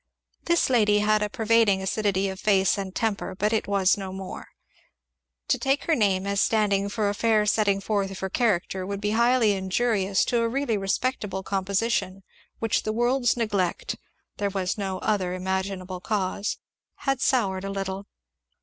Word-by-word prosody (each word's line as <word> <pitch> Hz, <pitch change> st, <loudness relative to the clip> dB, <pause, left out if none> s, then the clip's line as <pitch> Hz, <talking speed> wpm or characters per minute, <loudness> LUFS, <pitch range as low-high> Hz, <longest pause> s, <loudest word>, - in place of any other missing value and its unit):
This 340 Hz, 0 st, +3 dB
lady 210 Hz, -4 st, +4 dB
had 210 Hz, 0 st, +2 dB
a 210 Hz, -, 0 dB
pervading 225 Hz, -4 st, +3 dB
acidity 195 Hz, 0 st, 0 dB
of 190 Hz, 0 st, -5 dB
face 195 Hz, -2 st, +3 dB
and 195 Hz, -2 st, -5 dB
temper, 205 Hz, -4 st, -2 dB
but 210 Hz, +3 st, 0 dB
it 220 Hz, -, 0 dB
was 200 Hz, -1 st, +3 dB
no 190 Hz, -1 st, -5 dB
more. 190 Hz, 0 st, -7 dB, 1.0 s
To -, -, +2 dB
take 270 Hz, +1 st, +1 dB
her 330 Hz, -, +1 dB
name 200 Hz, -7 st, +2 dB
as 200 Hz, 0 st, +1 dB
standing 200 Hz, -2 st, +2 dB
for 210 Hz, 0 st, -1 dB
a 200 Hz, -, 0 dB
fair 215 Hz, 0 st, +2 dB
setting 205 Hz, -2 st, +2 dB
forth 200 Hz, -1 st, -1 dB
of 195 Hz, -, -7 dB
her 190 Hz, -, -3 dB
character 190 Hz, -5 st, 0 dB
would 200 Hz, +1 st, -4 dB
be 210 Hz, 0 st, -1 dB
highly 235 Hz, 0 st, +3 dB
injurious 195 Hz, 0 st, +1 dB
to 240 Hz, -1 st, +1 dB
a 230 Hz, -, +1 dB
really 270 Hz, -2 st, 0 dB
respectable 195 Hz, 0 st, -2 dB
composition, 195 Hz, 0 st, -1 dB, 0.3 s
which 225 Hz, -1 st, 0 dB
the 215 Hz, -, -2 dB
world's 245 Hz, +2 st, +1 dB
neglect 205 Hz, -6 st, -1 dB, 0.4 s
(there 200 Hz, -1 st, 0 dB
was 190 Hz, -2 st, -2 dB
no 195 Hz, -2 st, -3 dB
other 185 Hz, -4 st, 0 dB
imaginable 190 Hz, 0 st, -3 dB
cause) 200 Hz, +1 st, -2 dB, 0.4 s
had 270 Hz, -2 st, -1 dB
soured 195 Hz, -8 st, +1 dB
a 195 Hz, -, -4 dB
little. 195 Hz, 0 st, -4 dB
200 Hz, 170 wpm, -25 LUFS, 190-225 Hz, 1.0 s, lady